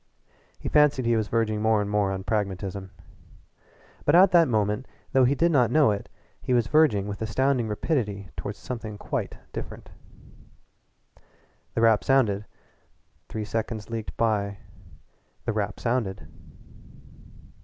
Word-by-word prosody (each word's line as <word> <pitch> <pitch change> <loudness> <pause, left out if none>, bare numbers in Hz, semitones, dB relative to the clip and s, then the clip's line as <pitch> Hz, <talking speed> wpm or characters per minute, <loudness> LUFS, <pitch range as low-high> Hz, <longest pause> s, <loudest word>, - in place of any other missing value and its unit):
He - - -7
fancied 145 -4 +3
he 115 0 +3
was 110 -1 0
verging 110 -2 0
more 110 0 +3
and 105 - -1
more 105 -1 +1
toward 95 0 -4
pragmatism. 100 -2 -2 1.1
But 145 - +3
at 185 +2 +7
that 170 -2 +6
moment, 105 +1 0 0.3
though 130 -1 +5
he 135 +3 +2
did 170 +3 +2
not 125 -7 +4
know 150 -2 +4
it, 100 - -4 0.3
he 125 - 0
was 120 -2 +3
verging 110 -8 +3
with 100 0 -6
astounding 125 +2 +1
rapidity 105 - -2
toward 100 - -5
something 110 -4 -6
quite - - -4 0.2
different. - - -7 1.8
The 115 - +1
rap 115 -2 +4
sounded 110 -7 +2 0.8
three 110 -1 -4
seconds 110 0 -4
leaked 115 -2 -5
by 100 -3 0 0.9
the 110 - -1
rap 105 -1 -2
sounded. 110 - -2
110 Hz, 135 wpm, -26 LUFS, 105-125 Hz, 1.8 s, at